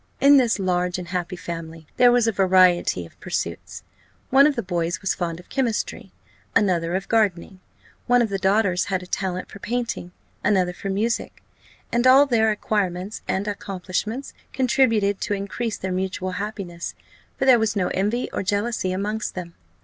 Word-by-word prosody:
In 280 +1 +7
this 245 -4 +3
large 180 -2 0
and 180 -2 -7
happy 180 0 -3
family 165 -2 -7
there 245 -1 +6
was 240 -1 +3
a - - +3
variety 185 - +3
of - - -18
pursuits. - - -4 0.5
One 275 +2 +7
of 295 - 0
the 235 - -2
boys 175 -1 -2
was 195 - 0
fond 170 -2 -3
of 180 - -15
chemistry, 250 -5 -2 0.4
another 180 -5 +2
of 195 - -3
gardening; 195 -4 0 0.5
one 245 0 +4
of 225 - -1
the 195 -1 -2
daughters 190 -1 +2
had 190 -2 -2
a - - -9
talent 185 0 -3
for 200 - -10
painting, 235 -6 -3 0.3
another 185 -3 +2
for 195 - -6
music; 215 +5 -2 0.5
and 240 +2 +2
all 270 +3 +8
their 225 -5 +2
acquirements 205 -2 -2
and 195 +2 -1
accomplishments 200 +5 -4 0.2
contributed 230 -6 +2
to 205 - -1
increase 205 +3 -3
their 190 - -4
mutual 185 0 -2
happiness, 190 -3 -5 0.4
for 270 - 0
there 255 -3 +7
was 220 -1 0
no 185 -3 0
envy 210 +6 -1
or - - -1
jealousy 205 0 -1
amongst 210 +3 -3
them. 175 -2 -6
195 Hz, 170 wpm, -23 LUFS, 180-225 Hz, 0.5 s, all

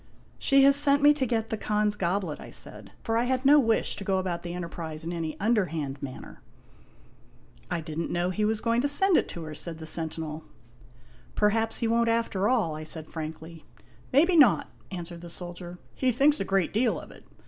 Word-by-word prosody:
" - - -31
She 275 0 +6
has 275 0 +7
sent 285 0 +4
me 295 0 +7
to 275 -3 -1
get 225 -1 -2
the 220 - -1
Khan's 210 0 0
goblet," 180 -4 -2
I - - -10
said, - - -7
for 225 -1 0
I 240 - +1
had 260 +1 -1
no 295 +2 +7
wish 225 -4 +1
to 200 - -6
go 195 -1 0
about 185 -2 -2
the 175 0 -6
enterprise 165 -3 -6
in 170 +2 -4
any 165 -2 -4
underhand 165 - -1
manner. 130 -2 -9 0.6
" - - -29
I 175 -2 -2
did 155 0 -6
n't 165 - -2
know 175 +1 -1
he 210 +3 -2
was 215 0 0
going 230 +1 +1
to 285 - +1
send 365 +6 +4
it - - +2
to 170 - -6
her," 155 -1 -7
said 155 +2 -2
the 160 - -9
sentinel. 160 -1 -3 0.5
" 120 -1 -27 0.3
Perhaps 225 +2 +1
he 230 - +1
won't 230 0 +2
after 230 -3 0
all," 215 -12 +1
I 155 - -6
said 155 0 -4
frankly. 160 +1 -7 0.3
" 120 +1 -28
Maybe 335 +7 +4
not," 280 -9 +5 0.2
answered 175 -2 -7
the 175 - -9
soldier; 175 0 -8 0.2
"he 260 -1 +1
thinks 280 +5 +3
a - - -2
great 195 -2 0
deal 235 +4 +1
of - - -12
it. - - -15
190 Hz, 220 wpm, -27 LUFS, 165-235 Hz, 0.6 s, has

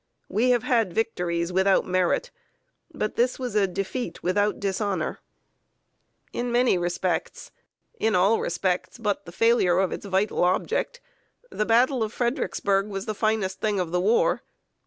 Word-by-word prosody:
We 225 +6 +2
have 245 -2 +3
had 225 - +1
victories 175 -5 -1
without 190 +1 +3
merit, 185 - 0 0.6
but 245 -9 -3
this 245 +2 +2
was 250 -4 -4
a 205 -2 +3
defeat 195 +1 -4
without 205 +3 +1
dishonor. 195 -3 -2 1.1
In 245 0 -2
many 245 -2 +3
respects 175 -1 -2 0.5
in 220 -1 +1
all 195 +5 +4
respects 180 +1 -2
but 205 -3 -2
the - - -8
failure 210 -3 +3
of 190 -1 +1
its - - -6
vital 195 +1 +1
object 470 - 0 0.5
the 215 - -1
battle 245 +3 +3
of 215 -1 -1
Fredericksburg 210 -5 0
was 195 -2 -5
the 215 - -2
finest 215 -3 -1
thing 210 -2 0
of 175 -3 -2
the 180 0 +1
war. 215 +5 +2
205 Hz, 150 wpm, -25 LUFS, 185-230 Hz, 1.1 s, all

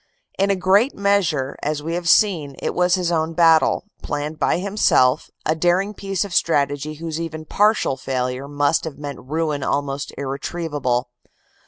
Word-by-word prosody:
In 195 +1 +2
a 200 - +3
great 195 +8 +3
measure, 190 -10 +1
as 150 0 -2
we 165 +2 -3
have 175 0 -1
seen, 165 -9 +3
it - - -3
was 180 0 +3
his 180 -2 -1
own 160 -1 0
battle, 165 -2 +4 0.2
planned 150 +1 -4
by - - +2
himself, 180 -9 +2 0.2
a 155 - +2
daring 175 +5 +1
piece 195 -1 -2
of 195 - -8
strategy 145 -2 +1
whose 165 +1 -5
even 160 -1 -6
partial 210 -8 +2
failure 130 0 -3
must 145 +2 +1
have 160 -3 -6
meant 145 -2 -6
ruin 150 +1 -2
almost 140 +1 -2
irretrievable. 140 -3 -2
160 Hz, 160 wpm, -21 LUFS, 140-180 Hz, 0.2 s, battle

